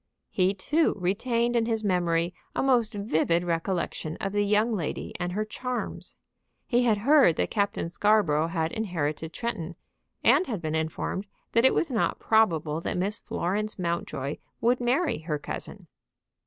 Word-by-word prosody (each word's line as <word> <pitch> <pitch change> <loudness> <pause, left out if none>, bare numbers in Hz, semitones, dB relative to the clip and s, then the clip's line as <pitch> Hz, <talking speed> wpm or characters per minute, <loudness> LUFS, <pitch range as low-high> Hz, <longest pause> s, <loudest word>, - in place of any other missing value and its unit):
He, 190 +1 +2
too, 300 +12 +1
retained 230 +6 0
in 230 -1 +2
his 225 -2 -1
memory 175 -3 +1 0.2
a - - +1
most 240 -5 +2
vivid 175 -4 +1
recollection 170 -2 -2
of 195 - -3
the 205 0 +1
young 210 +3 +2
lady 170 -8 -3
and 180 0 -2
her 215 +2 -1
charms. 250 +3 -4 0.5
He 245 0 +2
had 220 -3 +3
heard 265 - +5
that - - -1
Captain 200 -5 0
Scarborough 175 -5 +2
had 165 -1 -1
inherited 160 -7 -2
Tretton, 175 -8 -4 0.5
and 370 - +5
had 220 -6 -2
been 155 -2 -3
informed 160 +5 -2 0.2
that 230 +2 +4
it 265 - +5
was 320 - +1
not 225 - +1
probable 165 -8 +2
that - - -2
Miss 200 +3 -1
Florence 210 +5 -2
Mountjoy 170 -5 -2 0.2
would 245 +2 +2
marry 260 - +1
her 155 -1 -2
cousin. 145 - -7
200 Hz, 155 wpm, -27 LUFS, 170-230 Hz, 0.5 s, heard